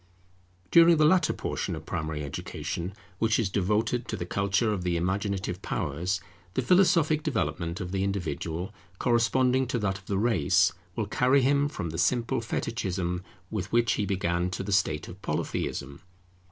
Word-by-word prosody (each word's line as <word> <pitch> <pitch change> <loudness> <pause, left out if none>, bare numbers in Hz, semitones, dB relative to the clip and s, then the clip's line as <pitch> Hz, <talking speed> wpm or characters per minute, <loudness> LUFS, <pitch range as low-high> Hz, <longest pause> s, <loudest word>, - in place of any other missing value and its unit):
During 170 0 +7
the 155 - +5
latter 165 0 +4
portion - - -3
of - - -9
primary 75 -1 -3
Education, 85 +5 -5 0.2
which 110 -1 +3
is 105 -5 0
devoted 110 +5 0
to - - -3
the 85 - -4
culture 100 +4 +1
of 95 - -2
the 90 -1 0
imaginative 95 +1 -2
powers, 90 +7 -2 0.4
the 130 - +1
philosophic 165 -2 +4
development 90 - -2
of 90 -1 -5
the 95 0 0
individual, 90 -1 -3 0.2
corresponding 125 +3 +2
to 125 - -1
that 100 -3 -1
of 95 - -23
the 100 - 0
race, 95 -4 +3 0.2
will 110 - -1
carry 130 +6 +3
him 140 +2 +3
from 85 - -4
the 80 - -4
simple 125 0 +1
Fetichism 95 -6 -2 0.3
with 105 -2 -3
which 115 -1 +3
he 105 -4 -1
began 90 -2 0
to 95 - -4
the 100 - -4
state 95 -6 +1
of 95 +3 -11
Polytheism. 70 -7 -3
100 Hz, 165 wpm, -28 LUFS, 90-120 Hz, 0.4 s, During